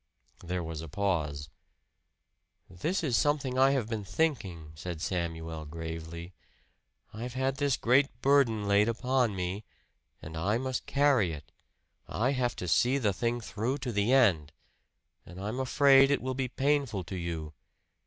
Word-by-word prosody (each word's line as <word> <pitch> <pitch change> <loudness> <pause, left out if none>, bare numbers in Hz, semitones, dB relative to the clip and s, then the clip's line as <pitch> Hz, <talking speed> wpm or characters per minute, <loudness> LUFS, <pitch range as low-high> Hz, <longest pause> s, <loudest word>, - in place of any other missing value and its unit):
There 90 0 -3
was 80 -1 -5
a 80 - -7
pause. 75 -7 -1 1.2
"This 160 - -2
is 135 -7 +1
something 135 -3 +1
I 135 +1 +6
have 135 -5 0
been 110 -2 -3
thinking," 95 - -2
said 85 +1 -6
Samuel 80 -2 -3
gravely. 80 +2 -7 0.8
"I've 120 +3 -6
had 130 +1 0
this 140 -2 +1
great 135 +4 +4
burden 125 -7 +3
laid 100 +2 +4
upon 125 -1 +1
me, 95 +3 -3 0.6
and 80 +1 -9
I 100 +7 0
must 130 0 -3
carry 135 - +3
it. 70 -3 -10 0.6
I 125 +5 0
have 125 -3 0
to 90 - -5
see 125 +10 +3
the 105 -7 +1
thing 120 +4 -1
through 115 +5 -2
to 125 - -1
the 105 +2 +1
end. 90 - +3 0.7
And 90 +2 -11
I'm 105 +6 -4
afraid 135 +1 +5
it 140 - +2
will 130 0 -2
be 130 0 -2
painful 135 -6 0
to 90 +3 -7
you. 85 -3 -4
110 Hz, 155 wpm, -30 LUFS, 85-130 Hz, 1.2 s, I